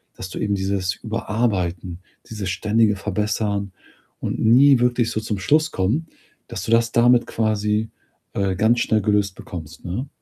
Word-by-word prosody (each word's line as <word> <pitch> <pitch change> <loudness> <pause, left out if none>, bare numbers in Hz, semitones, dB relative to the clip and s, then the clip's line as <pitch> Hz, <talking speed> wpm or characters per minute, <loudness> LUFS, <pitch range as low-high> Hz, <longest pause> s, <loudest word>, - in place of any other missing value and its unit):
dass 95 - -7
du - - -7
eben 100 -1 0
dieses 95 -2 -1
Überarbeiten, 95 -6 -2 0.3
dieses 105 -4 -4
ständige 105 +3 +2
Verbessern 105 0 -2 0.5
und - - -3
nie 130 +4 +6
wirklich 120 -1 +1
so 110 - -1
zum 110 -2 -3
Schluss 155 - +2
kommen, 115 - -1 0.4
dass - - -6
du 115 - -3
das 115 0 +3
damit 120 0 +4
quasi, 110 0 0 0.4
äh, 95 -2 0
ganz 110 +5 +3
schnell 110 -1 +1
gelöst 105 -2 +1
bekommst, 80 -2 -9
ne? 115 +11 -4
105 Hz, 155 wpm, -22 LUFS, 95-115 Hz, 0.5 s, nie